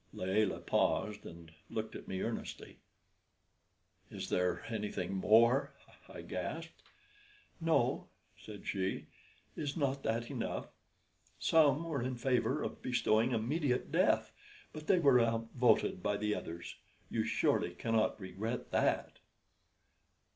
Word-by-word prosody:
Layelah 95 +2 0
paused, 105 0 0
and 85 -1 -11 0.2
looked 110 0 -4
at - - -8
me 95 0 -3
earnestly. 115 0 -5 1.3
"Is - - -6
there 90 0 0
anything 105 -4 -3
more?" 115 +7 +4 0.3
I - - -8
gasped. - - -5 0.8
"No," 165 -1 +1 0.3
said 105 -2 -11
she. 95 -1 -2 0.5
"Is 145 -1 -3
not 140 -2 0
that 115 0 -1
enough? - - -3 0.7
Some 155 -1 +4
were 160 -6 -2
in 130 +1 -2
favor 130 +3 +1
of - - -5
bestowing 120 -1 +2
immediate 125 +3 0
death, - - +3 0.4
but 155 0 -8
they 190 - +5
were 140 -7 +6
outvoted 115 -2 +2
by 105 +2 0
the 105 0 0
others. 85 -3 -6 0.3
You - - +1
surely - - +1
cannot 110 -1 +1
regret 105 +5 -4
that." - - +1
115 Hz, 120 wpm, -34 LUFS, 105-135 Hz, 1.3 s, were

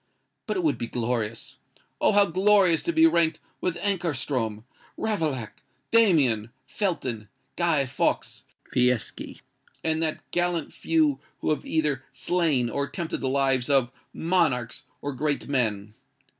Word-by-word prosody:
But - - -1
it 365 - -1
would 315 - +1
be 120 - -3
glorious—oh! 115 - -3
how 205 0 +6
glorious 190 -1 +4
to 340 - -1
be 325 -1 +5
ranked 170 - +3 0.2
with 180 -2 -1
Ankarstrom, 145 - -2 0.3
Ravaillac, 150 - -2 0.3
Damien, 145 - +4 0.2
Felton, 130 - -3 0.3
Guy 165 -5 +2
Fawkes, 130 0 -1 0.3
Fieschi, 125 -1 0 0.4
and 160 0 +1
that 160 -1 -1
gallant 175 -3 -1
few 155 -4 +1 0.2
who - - 0
have 155 - -2
either 150 -4 0
slain, 160 -9 +1
or 140 +4 -1
attempted 170 +2 -4
the 130 - 0
lives 135 -1 +1
of, 135 -4 +3 0.2
monarchs 160 -10 0 0.2
or 145 - -3
great 145 +2 -1
men! 110 -6 0
150 Hz, 130 wpm, -26 LUFS, 125-175 Hz, 0.4 s, how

